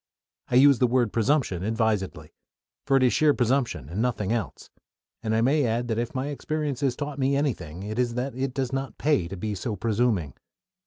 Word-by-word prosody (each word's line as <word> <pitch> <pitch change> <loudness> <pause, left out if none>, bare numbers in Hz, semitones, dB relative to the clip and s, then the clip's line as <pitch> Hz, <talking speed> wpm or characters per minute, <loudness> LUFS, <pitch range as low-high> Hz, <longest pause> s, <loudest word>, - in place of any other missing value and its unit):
I - - -1
use 140 0 +6
the 125 - +4
word 120 -3 +1
"presumption" 115 - +1
advisedly; 105 -8 -1 0.5
for 135 - +4
it 130 - +3
is 125 - +4
sheer 150 -2 +4
presumption 120 - 0
and 90 +8 -3
nothing 115 -5 -1
else, 115 -5 -4 0.5
and 110 -1 -1
I 110 - +2
may 140 +5 +3
add 120 0 0
that 110 0 0
if 120 +2 -3
my 135 +2 -2
experience 150 -2 -3
has 135 -3 +1
taught 145 0 -5
me 135 +1 +2
anything, 95 - -2
it 110 +3 -4
is 120 -2 0
that 130 +2 -2
it 130 +1 -3
does 135 -2 -2
not 135 0 -3
pay 145 - +1
to 95 +2 -7
be 105 +3 -3
so 105 +3 -3
presuming. 105 - 0
120 Hz, 205 wpm, -26 LUFS, 110-135 Hz, 0.5 s, use